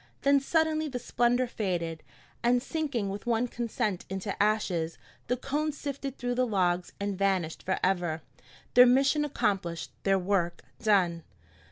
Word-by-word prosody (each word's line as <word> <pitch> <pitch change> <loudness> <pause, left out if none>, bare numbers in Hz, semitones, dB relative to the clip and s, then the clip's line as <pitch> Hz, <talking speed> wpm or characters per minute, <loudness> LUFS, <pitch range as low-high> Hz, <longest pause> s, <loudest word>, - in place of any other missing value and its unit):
Then 280 0 +5
suddenly 315 +2 +1
the 265 -4 -4
splendor 245 +1 +1
faded, 175 -9 -3 0.4
and 245 +1 +3
sinking 255 -7 -2
with 200 +4 -7
one 235 +1 +2
consent 230 -5 -2
into 190 +1 -3
ashes, 190 -6 +1 0.3
the 250 - 0
cones 290 +3 -2
sifted 275 -1 -5
through 245 -1 -2
the 250 0 +1
logs 180 -4 +1
and 200 0 -2
vanished 185 -4 0
forever, 180 -4 0 0.5
their 250 +1 +9
mission 275 +4 +4
accomplished, 195 - -1
their 195 -1 +3
work 180 -2 0 0.2
done. 185 -6 +3
215 Hz, 140 wpm, -29 LUFS, 185-255 Hz, 0.5 s, their